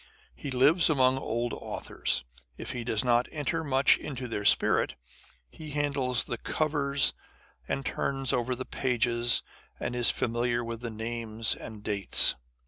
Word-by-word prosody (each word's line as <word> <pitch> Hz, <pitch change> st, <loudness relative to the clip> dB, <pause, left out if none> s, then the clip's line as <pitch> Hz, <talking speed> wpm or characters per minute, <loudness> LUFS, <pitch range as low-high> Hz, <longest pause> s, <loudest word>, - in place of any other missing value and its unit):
He 140 Hz, -, -8 dB
lives 145 Hz, +7 st, +3 dB
among 130 Hz, -3 st, +2 dB
old 120 Hz, -1 st, -3 dB
authors, 65 Hz, -, -3 dB, 0.3 s
if -, -, -6 dB
he 120 Hz, -, -5 dB
does 110 Hz, -3 st, 0 dB
not 120 Hz, 0 st, +2 dB
enter 160 Hz, +2 st, -2 dB
much 135 Hz, -2 st, +3 dB
into 130 Hz, -3 st, -6 dB
their 105 Hz, -3 st, -5 dB
spirit. -, -, +4 dB, 0.6 s
He 155 Hz, -, -10 dB
handles 140 Hz, -4 st, -1 dB
the 120 Hz, -, -6 dB
covers, 145 Hz, -3 st, 0 dB, 0.5 s
and 135 Hz, -, -3 dB
turns 135 Hz, +1 st, -1 dB
over 125 Hz, 0 st, -1 dB
the 130 Hz, +1 st, -6 dB
page, 125 Hz, -3 st, 0 dB
and 120 Hz, 0 st, -1 dB
is 120 Hz, -1 st, +4 dB
familiar 120 Hz, +1 st, -1 dB
with 115 Hz, 0 st, -6 dB
the 120 Hz, -, -4 dB
names 115 Hz, 0 st, 0 dB
and 110 Hz, -2 st, -10 dB
dates. 100 Hz, -3 st, +5 dB
125 Hz, 145 wpm, -28 LUFS, 115-140 Hz, 0.6 s, dates